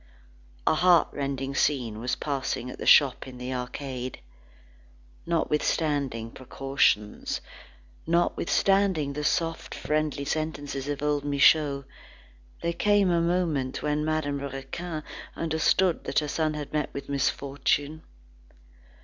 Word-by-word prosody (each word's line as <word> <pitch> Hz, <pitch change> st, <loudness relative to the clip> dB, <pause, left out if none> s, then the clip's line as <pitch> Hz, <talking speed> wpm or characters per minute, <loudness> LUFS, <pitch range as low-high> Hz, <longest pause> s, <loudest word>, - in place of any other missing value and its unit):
A -, -, +4 dB
heartrending 140 Hz, -6 st, +2 dB
scene 125 Hz, -6 st, 0 dB
was 125 Hz, +2 st, -1 dB
passing 135 Hz, -3 st, -3 dB
at -, -, -11 dB
the -, -, -4 dB
shop 140 Hz, -2 st, +6 dB
in 130 Hz, -1 st, -9 dB
the 125 Hz, +1 st, -4 dB
arcade. 125 Hz, 0 st, -5 dB, 1.1 s
Notwithstanding 145 Hz, -7 st, 0 dB
precautions, 130 Hz, -5 st, 0 dB, 0.7 s
notwithstanding 175 Hz, -1 st, +2 dB
the 150 Hz, +1 st, -4 dB
soft, 165 Hz, +2 st, -1 dB
friendly 150 Hz, -2 st, -1 dB
sentences 145 Hz, -3 st, -3 dB
of 145 Hz, 0 st, -3 dB
old 145 Hz, -1 st, +1 dB
Michaud, 140 Hz, 0 st, +4 dB, 0.8 s
there 170 Hz, 0 st, 0 dB
came 205 Hz, -1 st, +3 dB
a 170 Hz, -1 st, +3 dB
moment 165 Hz, -7 st, 0 dB
when 150 Hz, 0 st, 0 dB
Madame 155 Hz, -2 st, -1 dB
Raquin 140 Hz, +4 st, -5 dB, 0.3 s
understood 165 Hz, +3 st, +1 dB
that -, -, -3 dB
her 150 Hz, -, +3 dB
son 155 Hz, +1 st, 0 dB
had 150 Hz, -1 st, -6 dB
met 150 Hz, -2 st, -1 dB
with 140 Hz, 0 st, -5 dB
misfortune. 140 Hz, +2 st, 0 dB
145 Hz, 115 wpm, -27 LUFS, 135-160 Hz, 1.1 s, shop